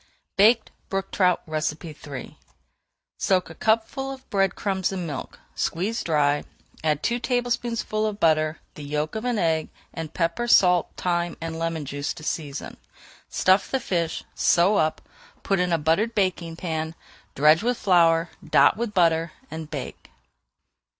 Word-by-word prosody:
BAKED 220 +3 +4 0.2
BROOK 195 0 -2
TROUT 180 -2 +2
III 155 -3 -5 0.8
Soak 185 -3 +1
a - - -8
cupful 225 - 0
of 265 -1 -10
bread 195 -2 +2
crumbs 190 -2 -1
in 185 -2 -3
milk, 145 -5 -6 0.2
squeeze 200 +7 -1
dry, 145 -2 +2 0.4
add 150 -2 +1
two 240 +1 +1
tablespoonfuls 240 -3 -1
of 205 -1 -8
butter, 155 -1 +2 0.2
the - - -10
yolk 150 +2 -2
of 220 +2 -4
an 245 -2 0
egg, 160 -4 +1 0.2
and 160 -2 -5
pepper, 170 +8 -1
salt, 180 -6 +5
thyme, 175 -1 -1
and 165 0 -5
lemon 165 -2 -2
juice 145 +2 -3
to 155 - -11
season. 150 -3 -4 0.5
Stuff 185 +2 +3
the 265 - 0
fish, 170 -7 -2
sew 180 +4 +3
up, 155 0 0 0.4
put 195 -1 +1
in 180 0 +1
a 165 - +3
buttered 165 +10 +1
baking 180 -5 0
pan, 160 -2 -3 0.4
dredge 155 +3 +5
with 245 +2 0
flour, 170 -3 +3
dot - - +4
with 230 -2 -3
butter, 165 -2 +3 0.2
and 160 -1 -6
bake. 145 -4 -7
170 Hz, 150 wpm, -25 LUFS, 160-205 Hz, 0.8 s, salt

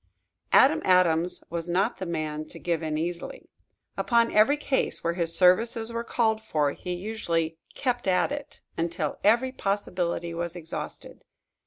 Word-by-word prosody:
Adam 310 +4 +6
Adams 180 -2 +3
was 170 0 -3
not 195 +7 +1
the 185 - -5
man 155 -2 -3
to 155 - -12
give 170 -2 -1
in 155 -1 -2
easily. 170 +2 -5 0.5
Upon 235 -1 +2
every 220 +8 +4
case 280 -2 -1
where 170 - +1
his 170 -1 -2
services 225 +5 +3
were 230 0 -2
called 220 -2 +1
for, 150 -9 0
he 180 +4 -5
usually 170 -5 -2 0.2
"kept 245 -5 -1
at 185 +7 +2
it" 290 0 -6
until 165 -2 -2
every 240 +5 +4
possibility 180 -6 -2
was 170 0 -3
exhausted. 165 -2 -7
180 Hz, 150 wpm, -27 LUFS, 165-225 Hz, 0.5 s, Adam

